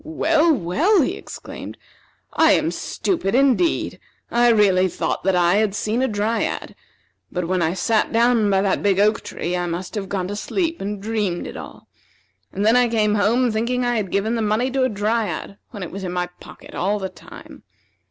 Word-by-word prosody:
"Well, 320 +1 +2
well!" 300 - +2
he - - -1
exclaimed, - - -9 0.6
"I - - +5
am - - +1
stupid, 285 - -2
indeed! 275 +6 +2 0.3
I 240 0 +4
really 195 -5 +4
thought - - -3
that 190 -1 +3
I 175 +2 +3
had 210 -2 +1
seen 215 +4 -1
a 265 - +2
Dryad; 215 +1 -2 0.6
but 180 -1 -2
when 185 0 0
I 165 +2 0
sat 220 +3 +1
down 230 -2 +3
by 195 -1 +2
that 195 - +1
big 200 -2 +2
oak 215 +2 +3
tree 175 +1 -4
I 175 0 -1
must 175 +2 -5
have 200 -3 -4
gone 185 -2 -2
to 205 - -3
sleep 335 - -2
and 205 +1 -4
dreamed 205 -4 -2
it - - -8
all; - - -10 0.6
and 200 - -2
then 225 +2 +5
I 250 -1 +4
came 215 -2 +2
home 225 +4 +2
thinking 240 +3 -1
I 240 -1 +1
had 205 -4 -2
given 205 +5 0
the 230 - -1
money 220 +5 0
to 270 +1 0
a 255 - +3
Dryad, 210 -1 -2
when 205 -5 -7
it 180 - -7
was 195 +1 -6
in 180 - -3
my 180 0 0
pocket - - -13
all 200 +4 0
the 190 -2 -3
time. - - -13
210 Hz, 200 wpm, -21 LUFS, 195-240 Hz, 0.6 s, I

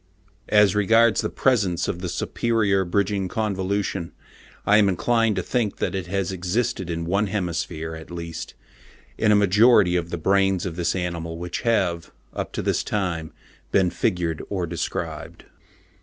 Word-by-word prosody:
As 105 -2 +5
regards 110 +2 +4
the - - -2
presence 105 -10 +1
of 85 - -3
the 90 -1 -4
superior 100 +1 0
bridging 100 +1 0
convolution, 95 -3 -2 0.5
I 105 - +5
am 100 -2 +5
inclined 115 +3 +1
to 95 - -1
think 115 -2 -1
that - - -2
it 95 -3 -3
has 95 -1 -1
existed 95 0 -2
in 85 -1 -3
one 100 +4 +1
hemisphere, 85 -4 -3
at 80 0 -9
least, 85 -1 -7 0.6
in 105 - +3
a - - +6
majority 105 -1 +5
of 85 -1 -1
the 85 - -3
brains 95 +1 +2
of 85 -3 -4
this 90 +1 -1
animal 85 -2 -3
which 90 +1 -4
have, 95 -8 0 0.2
up - - -4
to - - -3
this - - 0
time, 85 -6 -2 0.4
been 95 -3 +3
figured 85 -4 -1
or 95 -4 -1
described. 85 -1 -5
95 Hz, 155 wpm, -23 LUFS, 85-105 Hz, 0.6 s, a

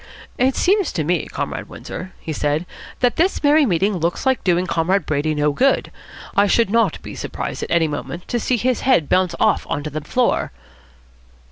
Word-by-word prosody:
"It 260 +1 +2
seems 390 -1 +2
to 160 - -1
me, 170 +2 0
Comrade - - -5
Windsor," 185 +1 -8
he 160 - -5
said, 150 +3 -1 0.4
"that 245 -1 +2
this 360 +1 +1
merry 295 0 +5
meeting 195 +1 +1
looks 170 - -2
like 265 -1 +1
doing 180 0 +2
Comrade 185 +3 0
Brady 155 +1 0
no 150 0 +2
good. 265 - +1 0.4
I 200 +1 +4
should 225 0 +2
not 230 +1 +2
be - - -8
surprised - - -5
at - - -4
any 170 -1 +3
moment 165 +4 -6
to 240 - 0
see 245 +2 0
his 250 +2 0
head 255 - +3
bounce 185 -2 +2
off - - +2
on 145 - -2
to 155 - -5
the 155 +2 -4
floor." 245 - 0
185 Hz, 195 wpm, -20 LUFS, 160-250 Hz, 0.4 s, merry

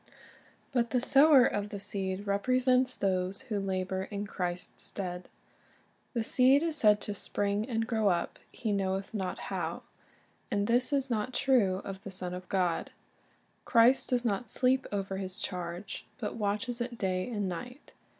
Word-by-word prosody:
But 240 -3 +1
the 250 - +2
sower 275 +1 +6
of 205 -3 -1
the 205 - -6
seed 195 0 -3
represents 255 +5 +2
those 190 +2 0
who 220 -6 -2
labor 190 -1 -2
in 205 0 -4
Christ's 180 -2 -4
stead. 180 -2 -4 0.9
The 230 - +1
seed 265 +5 +5
is 330 -2 0
said 210 -5 +5
to 205 - -4
"spring 205 +3 -1
and 225 -2 0
grow 220 -3 +1
up, 175 -3 0
he 230 -4 -3
knoweth 195 0 -1
not 190 -4 -2 0.2
how," - - -3 0.7
and 205 0 0
this 245 +5 +2
is 275 -2 0
not 225 +2 -1
true 205 -9 +2
of 195 -1 -6
the - - -6
Son 185 -1 -4
of 180 0 -8
God. 180 -3 0 0.7
Christ 235 +3 +4
does 245 -1 +1
not 220 +1 -1
sleep 255 +3 +2
over 195 -1 -2
His 190 -1 -5
charge, 180 +1 -5
but 220 -5 -4
watches 230 +3 -2
it 240 0 -4
day 185 +1 -1
and 205 -4 -2
night. 245 - -7
205 Hz, 160 wpm, -30 LUFS, 190-245 Hz, 0.9 s, sower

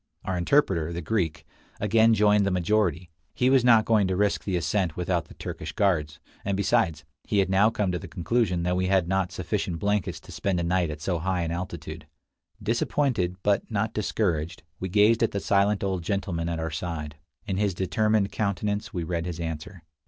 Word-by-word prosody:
Our 95 - -1
interpreter, 85 - +2
the 85 0 -5
Greek, 85 -4 -1 0.3
again 110 +2 +4
joined 105 -1 +4
the 100 - +1
majority; 90 -2 0 0.2
he 125 +1 +3
was 135 -2 +5
not 115 -3 +6
going 110 -4 +3
to 95 - 0
risk 105 +2 +1
the 95 - -2
ascent 90 -1 -1
without 90 -2 0
the - - -15
Turkish 75 0 -6
guards, 85 -7 0 0.2
and 100 -1 -1
besides, 100 -7 +1 0.2
he 105 - -1
had 95 -1 +2
now 100 +3 +5
come 105 -4 -1
to 90 - -2
the - - -9
conclusion 90 0 0
that 90 +1 +1
we 95 0 0
had 95 -3 +2
not 95 -1 0
sufficient 85 - -2
blankets 100 +2 -1
to - - -13
spend 95 -3 -1
a - - -1
night 85 0 +1
at 75 0 -6
so 85 +2 -1
high 90 0 -1
an 80 - -2
altitude. 85 -3 -6 0.6
Disappointed, 115 -5 0
but 105 -1 +1
not 110 0 -1
discouraged, 90 -6 -1 0.2
we 95 - -3
gazed 105 +4 +4
at 115 - +1
the 100 - 0
silent 100 +1 +2
old 95 -2 -1
gentleman 85 -2 -2
at 85 - -2
our 80 0 -3
side. 75 -2 -5 0.3
In 95 - -2
his 100 -2 0
determined 105 +2 +1
countenance 105 +1 -2
we 90 -5 -3
read 85 +1 -2
his 85 -1 -5
answer. 80 +2 -6
95 Hz, 195 wpm, -26 LUFS, 85-105 Hz, 0.6 s, not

